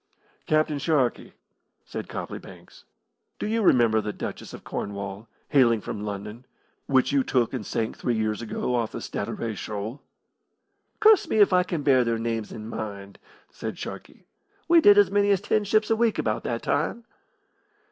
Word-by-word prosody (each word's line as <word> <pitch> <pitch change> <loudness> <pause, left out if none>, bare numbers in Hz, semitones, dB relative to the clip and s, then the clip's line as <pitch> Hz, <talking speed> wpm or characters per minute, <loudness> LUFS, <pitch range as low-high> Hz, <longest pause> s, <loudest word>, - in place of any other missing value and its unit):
"Captain 155 -2 +1
Sharkey," 140 -5 0 0.5
said - - -7
Copley - - -5
Banks, - - -15 0.5
"do - - -4
you 225 +2 0
remember 115 - +4
the 105 - -3
Duchess - - -7
of - - -10
Cornwall, 100 +1 -5 0.2
hailing 120 -5 +4
from 105 0 -6
London, 105 +4 -6 0.4
which 130 -1 +3
you 140 -1 +3
took 125 -2 0
and 125 -5 -3
sank 110 +2 -2
three 120 - -1
years 110 -1 -1
ago 115 +2 -3
off 115 -3 -1
the - - -4
Statira 115 -2 -4
Shoal?" 105 +7 -5 1.0
"Curse 435 -3 +6
me - - 0
if 205 -3 +5
I 180 - +5
can 170 -4 -3
bear 130 -3 +4
their 115 -1 0
names 115 -1 -3
in 110 0 -8
mind," 100 -3 -7 0.3
said - - -6
Sharkey. - - -9 0.4
"We 335 0 +6
did 205 -7 +7
as 205 -2 +5
many 205 0 +3
as 200 -2 +4
ten 210 0 +1
ships 215 +2 +2
a - - +5
week 230 -1 +1
about 110 -1 -1
that 115 -1 -2
time." 160 +11 -1
125 Hz, 170 wpm, -25 LUFS, 110-185 Hz, 1.0 s, did